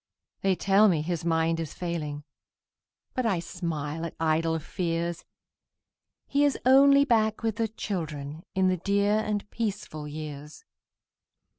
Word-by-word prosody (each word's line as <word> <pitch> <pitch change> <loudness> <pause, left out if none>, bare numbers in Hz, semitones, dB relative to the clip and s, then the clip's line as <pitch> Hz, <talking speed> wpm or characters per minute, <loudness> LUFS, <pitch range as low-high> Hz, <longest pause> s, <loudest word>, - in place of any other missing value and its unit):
They 195 -1 +2
tell 195 +4 +4
me 160 -5 +1
his 170 0 -2
mind 165 0 +1
is 160 -3 -5
failing, 155 -4 -4 0.9
But 255 -2 0
I 195 -5 +2
smile 165 -3 -4
at 170 - -5
idle 160 0 +1
fears; 170 +1 -3 1.0
He 285 +1 +1
is 290 -1 +2
only 280 +2 +7
back 220 -4 +2
with 220 -2 -1
the 225 - +1
children, 160 -8 -5
In 190 0 +3
the 185 0 +2
dear 200 +3 +2
and 210 -1 -2
peaceful 195 -9 -4
years. 150 -1 -8
170 Hz, 135 wpm, -27 LUFS, 160-210 Hz, 1.0 s, only